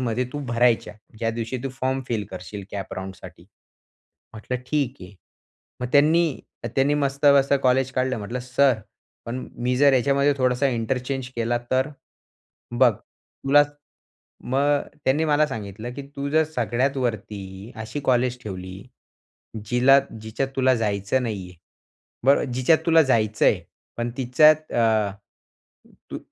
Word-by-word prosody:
मध्ये 125 0 -1
तू 145 - -4
भरायच्या. 120 -1 +2 0.2
ज्या 115 0 0
दिवशी 115 +2 -4
तू 135 - -2
फॉर्म 130 +1 0
फिल 110 -4 -1
करशील 95 +2 -8
कॅप 100 -2 -6
राउंडसाठी. 95 0 -9 0.9
म्हटलं 115 +3 -4
ठीक 140 -4 0
आहे. 95 +2 -11 0.7
मग 125 - -2
त्यांनी. 155 +1 +3 0.3
त्यांनी 140 +2 +2
मस्त-मस्त 140 0 +3
कॉलेज 130 0 +2
काढलं 130 -1 0
म्हटलं 110 +5 -5
सर. 130 +1 +3 0.5
"पण 125 +2 -5 0.2
मी 125 0 +1
जर 140 +1 +5
याच्यामध्ये 140 +3 +3
थोडासा 130 +1 +2
इंटरचेंज 125 +2 -2
केला 120 +1 0
तर?" 130 +2 +2 0.9
बघ 125 -3 +6
तुला, 140 +8 0 0.8
मग 140 +3 +1 0.2
त्यांनी 145 +5 +2
मला 150 0 +3
सांगितलं 110 -1 -6
की 140 - -6
तू 140 +1 -3
जर 160 +1 +3
सगळ्यात 125 +4 0
वरती 105 -3 -4
अशी 110 +7 -5
कॉलेज 125 -1 +1
ठेवली. 95 -1 -7 0.8
जिला 130 +4 +5 0.2
जिच्यात 115 +5 -3
तुला 130 -1 +4
जायचं 105 +2 0
नाही 100 -6 -4
आहे. 90 - -15 0.7
बरं 140 +1 +5
जिच्यात 130 +6 +3
तुला 165 -1 +6
जायचं 110 -5 +1
आहे - - +3 0.4
पण 120 0 -2
तिच्यात 155 +5 +4
अ, 110 -4 +2 1.0
तू - - -4
125 Hz, 135 wpm, -23 LUFS, 110-140 Hz, 1.0 s, बघ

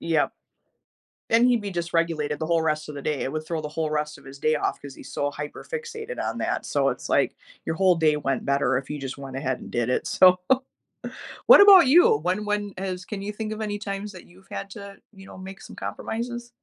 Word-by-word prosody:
Yep. 160 -3 +1 1.0
Then 230 +2 +5
he'd 240 -3 +2
be 200 - -5
dysregulated 165 -3 -1
the 160 - -3
whole 170 -1 +2
rest 155 -1 -1
of 150 - -7
the 140 - -7
day. 150 -1 -1
It 135 - -3
would 155 0 -4
throw 165 -2 -2
the 150 - -4
whole 155 0 -2
rest 150 0 -2
of - - -18
his 135 +1 -11
day 155 +2 +2
off - - -1
because 140 -2 -10
he's - - -12
so 145 - -1
hyper 150 0 -7
fixated 470 0 -5
on - - -3
that, - - -2
so - - +1
it's - - -6
like, - - +2 0.3
your 160 - -2
whole 185 0 +4
day 155 -2 +3
went 135 -3 -2
better 140 -2 +1
if 135 - -9
you 150 - -3
just 135 +1 -6
went 135 -1 -7
ahead 130 -2 -2
and - - -10
did 120 -1 -1
it, 125 - 0
so, 185 -1 +6 1.1
what - - +10
about 395 -5 +9
you? 280 - +6
When 180 +6 -1
when 205 -1 -2
is 185 -1 -4
can 205 -1 -6
you 205 +1 -4
think 215 0 -5
of 215 - -5
any 205 -1 -3
times 205 0 -5
that 185 - -12
you've 190 +2 -20
had 195 0 -6
to, 200 -1 -9 0.2
you 195 0 -13
know, - - -12
make 190 +1 -9
some - - -12
compromises? 240 +1 -5
175 Hz, 240 wpm, -25 LUFS, 150-205 Hz, 1.1 s, what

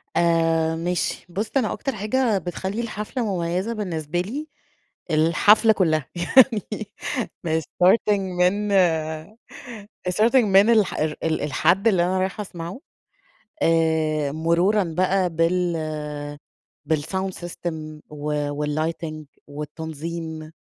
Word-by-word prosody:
آآ 165 -1 +2
ماشي، 175 +2 -2
بُص 205 +5 -3
أنا 235 -5 +1
أكتر 270 -4 -3
حاجة 215 +2 +1
بتخلّي 190 +4 -4
الحفلة 230 +2 -4
مميّزة 180 +6 -1
بالنسبة 175 -6 -3
لي 275 +12 -5 0.6
الحفلة 205 +8 +5
كلّها، 155 -8 +1
يعني 215 +2 +3 0.6
من 160 0 +1
starting 190 +7 +3
من 190 +2 0 1.4
starting 215 +7 +2
من 200 +2 +5
الح 215 -4 +3
ال 155 0 -2
ال 160 -1 0
الحد 165 - +2
اللي 190 -6 +4
أنا 185 +2 0
رايحة 190 +3 -2
اسمعه، 175 +1 -7 0.8
آآ 160 -3 +2
مرورًا 170 +7 +2
بقى 185 +2 +1
بال 170 +1 +1 1.2
بالsound 190 +6 -2
system 160 -3 -6
و 150 0 -2 0.2
والlighting 155 +1 -3 0.2
والتنظيم، 160 +2 -6
175 Hz, 105 wpm, -23 LUFS, 160-200 Hz, 1.4 s, الحفلة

